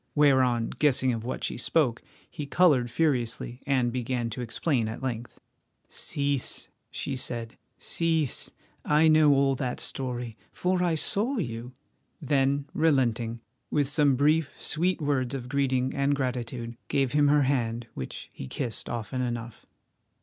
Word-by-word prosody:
Whereon, 130 -5 +3
guessing 130 -3 +3
of 115 -1 -4
what 125 - -4
she - - -2
spoke, 125 -2 +1 0.3
he 150 -4 -7
coloured 140 -7 +4
furiously, 125 -4 -1
and 130 -3 +2
began 125 -1 -2
to 125 - -5
explain 120 0 0
at 110 +4 -6
length. 120 -2 -4 0.5
"Cease," 140 -2 -1 0.2
she 140 - -4
said—"cease. 130 +5 -1 0.3
I 150 +2 +4
know 155 -1 +6
all 135 0 +3
that 125 -1 -3
story, 125 -4 -4
for 180 0 0
I 175 -2 +2
saw 220 - +1
you," 120 - -4 0.5
then, 140 -2 +1
relenting, 120 -7 +1 0.3
with 145 -2 +1
some 145 -1 +3
brief, 150 +3 +2
sweet 180 +5 0
words 140 -3 0
of 125 -2 -5
greeting 130 -1 0
and 140 +1 +1
gratitude, 120 -3 -3
gave 135 -3 +1
him 145 0 +4
her 145 0 +4
hand, 120 -3 0
which 65 - -7
he 65 - -7
kissed 120 - -3
often 120 +2 -3
enough. 120 -2 -5
130 Hz, 140 wpm, -27 LUFS, 120-145 Hz, 0.5 s, know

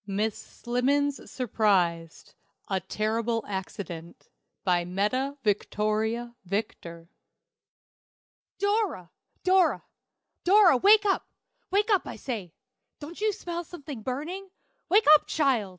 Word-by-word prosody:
MISS 205 +2 -1
SLIMMENS 275 +4 -1
SURPRISED. 185 -9 0 0.4
A 190 -1 +1
Terrible 225 +4 -2
Accident. 185 -3 -7 0.3
BY 175 -2 +2
METTA 235 +10 -1
VICTORIA 215 +3 -1
VICTOR. 170 -4 -5 1.5
"Dora! 405 - -1 0.3
Dora! 370 0 +3 0.6
Dora! 375 -6 +6
wake 415 - +6
up, 390 - +1 0.4
wake 415 +3 +1
up, 395 - +2
I - - -6
say! 215 -10 -5 0.5
Don't 320 +6 -9
you 430 0 +2
smell 345 -4 -5
something 290 -7 -9
burning? 315 - -5 0.4
Wake 415 +5 +5
up, 305 - +5
child! 265 -10 +1
240 Hz, 105 wpm, -27 LUFS, -, 1.5 s, Dora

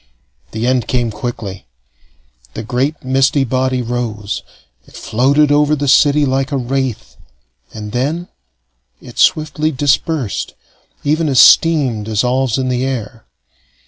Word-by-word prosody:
The 110 +1 -4
end 125 -2 +1
came 120 -3 0
quickly. 105 - -6 0.9
The 110 - -5
great 130 +7 -2
misty 135 +2 +2
body 130 0 -1
rose; 115 -4 -4 0.5
it - - -18
floated 140 +6 +2
over 150 +1 +3
the 145 -1 -3
city 145 +2 +4
like 135 +2 -1
a 140 - 0
wraith, 130 -2 -3 0.5
and 105 -1 -8
then 150 +9 -2 0.7
it - - -12
swiftly 155 0 +2
dispersed, 145 -3 -1 0.5
even 155 +2 +1
as 130 -3 +3
steam 140 -6 +5
dissolves 125 +3 0
in 130 -1 -1
the 125 0 -1
air. 115 -4 -5
130 Hz, 125 wpm, -16 LUFS, 120-145 Hz, 0.9 s, steam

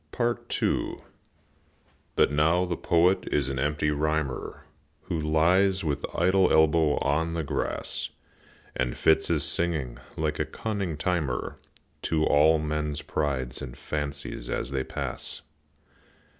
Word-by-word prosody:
II. 120 0 -1 1.1
But - - +4
now 80 +5 +3
the 90 -1 -2
Poet 85 +3 +2
is 70 -2 +1
an 65 -1 -2
empty 75 +2 +1
rhymer 75 -2 -2 0.4
Who 80 - -2
lies 90 +5 +3
with 75 -2 -1
idle 95 +2 +3
elbow 80 -1 +4
on 80 +3 0
the 80 - -1
grass, 70 - -2 0.7
And 60 -1 -1
fits 80 0 +3
his 80 -4 +1
singing, 75 -8 -1 0.2
like 75 -1 -1
a - - +1
cunning 100 -8 -3
timer, 75 -7 -1 0.5
To 80 -1 +2
all 75 +2 +5
men's 75 -1 -2
prides 65 -4 -2
and - - -7
fancies 70 -4 -4
as 60 - -2
they 65 -1 -1
pass. - - -5
75 Hz, 125 wpm, -27 LUFS, 75-85 Hz, 1.1 s, all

